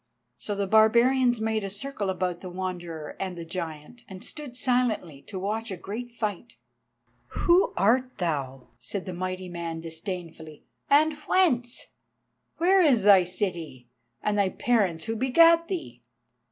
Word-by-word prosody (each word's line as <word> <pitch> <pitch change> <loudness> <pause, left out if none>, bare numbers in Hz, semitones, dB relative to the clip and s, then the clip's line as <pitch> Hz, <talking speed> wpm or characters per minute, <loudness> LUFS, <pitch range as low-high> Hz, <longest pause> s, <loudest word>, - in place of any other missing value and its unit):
So 205 - -5
the 200 0 -1
barbarians 235 +4 +4
made 220 -1 -1
a 195 - -3
circle 205 0 -4
about 180 -2 -2
the 185 - -7
Wanderer 175 -4 -5
and 185 -2 -4
the 170 - -6
giant, 165 +5 -6
and 190 -1 -9
stood 285 -5 -7
silently 235 - 0
to 195 - -6
watch 215 +4 -3
a 190 - -5
great 230 +7 -6
fight. 225 0 -4 0.9
"Who 355 +2 +4
art 250 +5 +2
thou?" 135 -7 -3
said 180 - -4
the 185 - -5
mighty 185 +1 -4
man 170 -2 -5
disdainfully, 165 -2 -7 0.3
"and 310 +2 +5
whence? 250 -10 +2 0.7
Where 375 +3 +4
is 265 - +4
thy 195 -2 +7
city, 170 - -4 0.3
and 210 -1 +1
thy 195 -2 +3
parents 190 -7 +1
who 225 0 -2
begat 330 +8 +5
thee?" 125 - -5
200 Hz, 145 wpm, -26 LUFS, 175-245 Hz, 0.9 s, thy